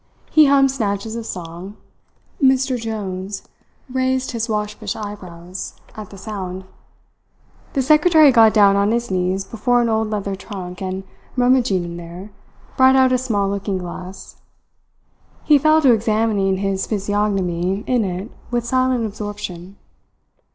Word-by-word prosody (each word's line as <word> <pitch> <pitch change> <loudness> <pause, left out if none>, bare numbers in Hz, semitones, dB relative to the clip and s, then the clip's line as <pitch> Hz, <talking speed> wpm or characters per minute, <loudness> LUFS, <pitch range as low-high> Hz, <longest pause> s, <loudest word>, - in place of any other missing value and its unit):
He 310 -2 +6
hummed 275 -1 +4
snatches 220 -3 -2
of 230 -1 -5
song. 175 +3 -7 0.6
Mr. 265 -1 +3
Jones 200 -4 -5 0.4
raised 260 0 -1
his 230 -1 -3
waspish 210 +1 -3
eyebrows, 185 -4 -8 0.2
at 215 -3 -8
the 200 - -12
sound. 190 -2 -6 1.1
The 270 - +1
secretary 305 +1 +6
got 225 -3 +6
down 200 -2 +5
on 200 +1 +2
his 235 -2 -1
knees 185 +1 0
before 245 +4 +1
an 235 -1 +1
old 220 -1 0
leather 200 -2 -3
trunk, 185 -2 -8
and, 190 0 -4 0.3
rummaging 245 -7 +2
in 170 0 -6
there, 175 +4 -9 0.5
brought 260 0 +6
out 260 -1 +5
a 255 - +3
small 210 -6 0
looking 200 0 -2
glass. 180 +1 -8 1.1
He 295 -2 +5
fell 310 +2 +4
to 260 -3 +6
examining 215 -3 +1
his 195 0 -2
physiognomy 195 -2 -1
in 250 -3 +1
it 190 +3 -4 0.2
with 240 -1 -1
silent 255 -1 +1
absorption. 200 -3 -7
210 Hz, 135 wpm, -20 LUFS, 190-245 Hz, 1.1 s, He